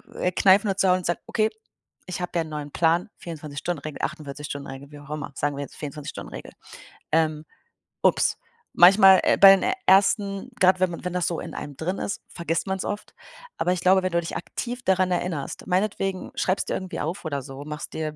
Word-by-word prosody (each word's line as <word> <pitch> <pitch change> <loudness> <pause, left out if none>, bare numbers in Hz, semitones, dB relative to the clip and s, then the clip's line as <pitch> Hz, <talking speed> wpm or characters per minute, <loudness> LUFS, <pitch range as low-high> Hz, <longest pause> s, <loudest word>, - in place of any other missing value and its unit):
äh, 180 - 0
kneifen 195 +3 +4
und 195 0 -2
zu 195 - +4
hauen 180 - +5
und 185 - -6
zu - - 0
sagen: - - -21
„Okay, 220 -1 +1 0.6
ich 180 -1 -5
habe 180 - -3
ja 170 - +2
neuen 150 -2 -6
Plan, 170 +5 +2
24- 155 -4 -7
Stunden-Regel, 155 -4 -4
48- 150 -2 -4
Stunden-Regel“, 140 0 -8
wie 145 - -11
auch 145 0 -15
immer. 150 -2 -5
Sagen 145 0 -1
wir 145 - -3
jetzt - - -11
24- 150 0 -6
Stunden-Regel. - - -9 0.6
Ähm. 155 -1 +1 0.6
Ups. - - +3 0.4
Manchmal, 190 +1 +8
äh - - +3
bei 195 0 +10
den 195 - 0 0.2
ersten, 195 +2 +3
grad 185 0 +5
wenn 185 - +3
man 170 - -8
wenn 180 - -2
das 180 -1 0
so 170 - -2
in - - -7
einem 145 -2 -7
drin 180 +4 -3
ist, 200 - -4
vergisst 170 -1 -2
man's 190 0 -2
oft. 205 0 -5 0.4
Aber 180 - +1
ich 180 - -4
glaube, 190 +1 +5
wenn 185 - -1
du 170 - +2
dich 165 - -6
aktiv 245 +7 -5
daran 185 -2 +2
erinnerst, 175 -4 -3
meinetwegen 195 0 -1
schreib's 190 +2 0
dir - - -3
irgendwie 185 0 -5
auf 165 +6 -3
oder 140 -3 -2
so, 135 +1 -9
machst 150 0 -7
dir 155 -1 -3
175 Hz, 210 wpm, -25 LUFS, 150-190 Hz, 0.6 s, bei